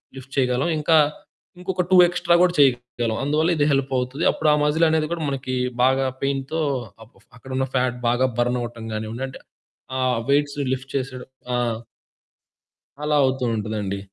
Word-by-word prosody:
Lift 135 +1 -11
చేయగలం 130 +4 +1
ఇంకా, 155 +2 +3 0.6
ఇంకొక 180 0 -1
2 185 - +7
ఎక్స్ట్రా 175 0 +2
కూడా 180 -1 +3
చేయగలం. 120 -4 +2
అందువల్ల 155 +4 +2
ఇది 145 - +3
హెల్పవుతుంది. 135 +1 -1
అప్పుడు 155 - 0
ఆ - - +4
మజిల్ 155 +3 +3
అనేది 155 -1 +1
కూడా 170 -2 -2
మనకి 130 -1 -3 0.3
బాగా 130 +1 +3 0.2
పెయిన్‌తో 140 +3 -1 0.4
అక్ 110 - -19
ఫ - - -34
అక్కడున్న 130 +2 -3
ఫ్యాట్ 125 -1 +1
బాగా 125 +2 +2
బర్న్ 120 +1 +1
అవ్వటం 115 -1 -6
కానివ్వండి 110 +4 -4
అంటే, 130 - -10 0.6
ఆ - - -1 0.3
వెయిట్స్ 145 0 +1
లిఫ్ట్ 130 +1 -5
చేసేయడం 130 -1 -5 0.2
ఆ! - - +2 1.5
అలా 150 0 +2
అవుతూ 130 -1 0
ఉంటదండి. 105 -2 -3
130 Hz, 155 wpm, -23 LUFS, 125-150 Hz, 1.5 s, 2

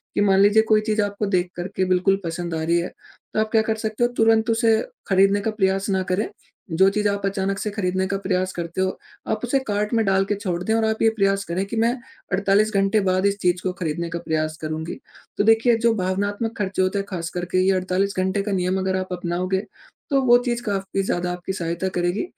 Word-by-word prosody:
कि - - +2
मान 195 -1 +4
लीजिए 205 +2 +6
कोई 215 -1 +5
चीज़ 215 0 0
आपको 205 +1 -2
देख 180 0 -1
कर 175 +1 -4
के 185 - +2
बिल्कुल 185 +2 +2
पसंद 170 +1 -4
आ 160 - -2
रही 170 +2 +2
है, 175 - -2 0.5
तो - - 0
आप 215 0 0
क्या 220 - +4
कर 220 0 0
सकते 220 +1 -2
हो 240 - +1
तुरंत 225 +1 +3
उसे 225 -1 +3 0.3
खरीदने 195 +1 +3
का 220 - -1
प्रयास 195 -2 0
ना 190 -1 +1
करें, 200 +4 0 0.4
जो 190 +4 +5
चीज़ 210 +1 0
आप 200 0 -2
अचानक 195 0 -1
से 210 - -2
खरीदने 190 -2 -1
का 195 +1 -1
प्रयास 185 -1 -1
करते 170 +1 -4
हो, 190 0 -1 0.3
आप 215 -1 -1
उसे 255 +3 +1
कार्ट 210 +1 -1
में 225 -1 +3
डाल 195 0 +2
के 205 - +2
छोड़ 180 -4 -3
दें 220 +4 0
और 225 -1 +2
आप 220 0 -1
ये 225 - +5
प्रयास 195 -1 +2
करें 180 +3 -2
कि 200 - -6
मैं 235 +1 +2 0.4
48 200 +3 +2
घंटे 195 +2 +2
बाद 185 +1 +1
इस 200 0 +2
चीज़ 180 0 +1
को 185 - 0
खरीदने 170 -1 -3
का 170 - -4
प्रयास 155 -1 -2
करूँगी। 155 +2 -4 0.4
तो - - +2
देखिए, 225 +2 +4
जो 230 0 +2
भावनात्मक 205 +4 -2
खर्चे 190 -2 -1
होते 185 +2 +1
हैं 195 - -3
खास 170 -3 -4
करके 180 +1 -1
ये 195 - +5
48 185 +2 0
घंटे 190 +2 +1
का 205 - -3
नियम 185 0 0
अगर 190 0 0
आप 185 0 -4
अपनाओगे, 180 +2 -2 0.5
तो 275 -1 +3
वो 240 -1 +7
चीज़ 240 -1 -1
काफ़ी 195 -2 -2
ज़्यादा 180 -2 -1
आपकी 180 +1 -4
सहायता 170 0 -2
करेगी, 175 - 0
195 Hz, 235 wpm, -23 LUFS, 180-215 Hz, 0.5 s, वो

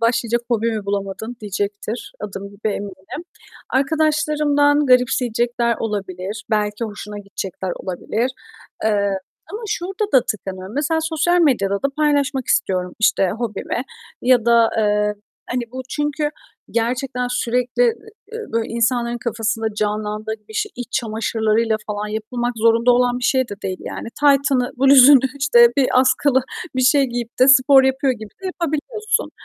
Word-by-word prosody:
başlayacak 235 0 +1
hobi 230 0 +1
mi 215 -2 -4
bulamadın 200 +4 -4
diyecektir. 205 +2 -4
Adım 200 -1 -6
gibi 200 +2 -4
eminim. 200 - -6 0.5
Arkadaşlarımdan 295 0 +2
garipseyecekler 240 -2 +2
olabilir. 200 -2 -4
Belki 210 +1 0
hoşuna 210 -1 -7
gidecekler 190 -2 -5
olabilir, 215 +6 -2 0.5
eee, 205 -2 +2 0.4
ama 435 +3 -5
şurada 390 -1 -3
da 255 -3 +5
tıkanıyorum. 190 -1 -5
Mesela 305 +3 0
sosyal 330 +2 +1
medyada 220 -11 +2
da 275 - +2
paylaşmak 285 -4 +1
istiyorum, 180 -1 0
işte, 195 -3 +3
hobimi 235 +1 -3 0.4
ya 245 -2 +4
da, 235 -1 +4
eee, 210 -1 +1 0.4
hani, 245 0 -1
bu 260 - -5
çünkü 295 0 -1 0.4
gerçekten 250 +2 -1
sürekli, 250 - 0
e - - +6 0.5
e 455 -1 -8
böyle, 225 0 -1
insanların 235 +1 0
kafasında 225 -1 -2
canlandığı 210 +1 -2
gibi 215 -1 -21
işte - - -2
iç 245 0 -7
çamaşırlarıyla 220 -1 0
falan 210 0 -3
yapılmak 240 +3 -3
zorunda 230 +2 +4
olan 245 0 +2
bir 245 - -5
şey 260 -2 +2
de 205 - -5
değil 185 -1 -3
yani. - - -6
Taytını, 275 -3 +3
bluzunu 275 +1 +8 0.2
işte 240 -4 +6
bir 270 - +4
askılı 260 +1 +3 0.3
bir 255 - +2
şey 275 +2 +5
giyip 240 -2 -5
de 260 - +6
spor 270 0 +7
yapıyor 265 0 +1
gibi 220 -3 -9
de - - -4
yapabiliyorsun. 365 - -2
235 Hz, 140 wpm, -20 LUFS, 215-270 Hz, 0.5 s, bluzunu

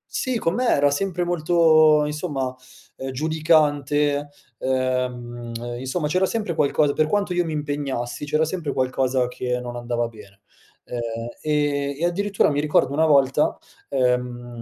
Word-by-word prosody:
Sì, 255 -3 0
con 165 -5 0
me 250 +1 0
era 145 0 +3
sempre 180 +3 -1
molto 155 -3 +4
insomma, 145 -4 -3 0.4
ehm, 135 - -5
giudicante, 145 -1 +1 0.3
ehm 125 -2 -2 0.3
insomma, 150 +4 -2
c'era 185 +4 +2
sempre 210 -5 -2
qualcosa 145 -1 +2
per 155 - +2
quanto 200 0 0
io 175 0 +2
mi 160 - -3
impegnassi, 145 -4 -3
c'era 155 +2 +1
sempre 160 -4 -3
qualcosa 130 -1 0
che 125 0 -3
non 120 0 -6
andava 120 -1 -2
bene, 100 -2 -16 0.4
ehm, 120 - -6 0.4
e 145 -2 0
e 170 - +1
addirittura 195 +1 +1
mi 145 - 0
ricordo 150 -2 +2
una 160 +2 +3
volta 140 0 +3 0.3
ehm, 125 -2 -1
145 Hz, 145 wpm, -23 LUFS, 130-160 Hz, 0.4 s, molto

